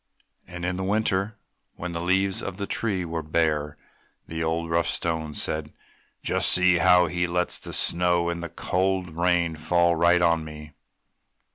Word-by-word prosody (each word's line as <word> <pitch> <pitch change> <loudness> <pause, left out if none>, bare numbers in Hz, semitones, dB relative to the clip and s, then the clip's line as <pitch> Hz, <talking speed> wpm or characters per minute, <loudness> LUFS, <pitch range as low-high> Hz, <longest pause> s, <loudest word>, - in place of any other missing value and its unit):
And 90 0 -6
in 90 0 -2
the 95 - -3
winter 95 -1 +1
time 105 +1 -14 0.4
when 90 0 -6
the 85 0 -4
limbs 95 +2 +1
of 95 -2 -6
the 100 - -3
tree 100 -4 -2
were 80 0 -4
bare, 75 -2 -1 0.5
the 80 0 -4
old, 80 +1 -2
rough 85 0 +1
Stone 80 -3 -2
said, 75 -1 -3 0.5
"Just - - +2
see 90 -1 +4
how 90 +1 +5
he 90 +1 -1
lets 90 0 -2
the - - -9
snow 85 0 +3
and 85 0 -3
the 85 - -5
cold 95 -2 -2
rain 85 -1 +1
fall 85 +2 +2
right 85 +1 +3
on 85 -1 +2
me!" 75 -1 -10
85 Hz, 170 wpm, -25 LUFS, 80-90 Hz, 0.5 s, how